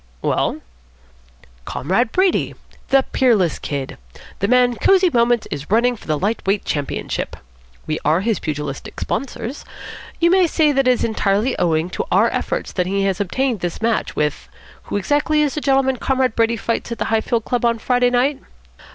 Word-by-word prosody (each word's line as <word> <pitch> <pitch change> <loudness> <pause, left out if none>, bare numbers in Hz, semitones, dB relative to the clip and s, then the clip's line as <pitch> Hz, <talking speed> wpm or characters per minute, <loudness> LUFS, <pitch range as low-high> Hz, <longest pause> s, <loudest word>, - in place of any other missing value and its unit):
"Well?" - - 0 1.0
"Comrade 195 - -1
Brady. 375 -1 +1 0.3
The 270 -1 +4
Peerless 215 -10 +2
Kid. 140 - -5 0.4
The 200 - +1
man 245 0 +3
Cosy 375 -2 +4
Moments 235 -1 +2
is 145 0 -5
running 240 +4 +3
for - - -16
the 155 -1 +1
light 205 +8 -1
weight 200 +1 +1
championship. 145 -2 -3 0.5
We 155 0 -2
are 155 +4 +2
his 220 +1 0
pugilistic 150 -3 -5
sponsors. 270 0 -4 0.6
You 340 0 +4
may 370 -1 +5
say 310 -2 +2
that 270 -2 +1
it - - +6
is 245 - 0
entirely 220 +2 +1
owing 165 0 +1
to - - -3
our - - +4
efforts - - -3
that 180 -1 -1
he 195 +1 0
has 195 0 0
obtained 245 +4 -1
this 175 -1 -4
match 225 0 -1
with 150 -1 -2 0.4
who - - -2
exactly 295 +7 +1
is 290 - 0
the 300 - -3
gentleman 270 -2 +2
Comrade 260 -1 0
Brady 230 0 +2
fights 230 +2 -3
at 235 - -3
the - - -2
Highfield 225 +1 0
Club 245 -2 -1
on 235 -1 +2
Friday 245 +2 +2
night?" 260 +3 +1
235 Hz, 175 wpm, -20 LUFS, 195-265 Hz, 1.0 s, it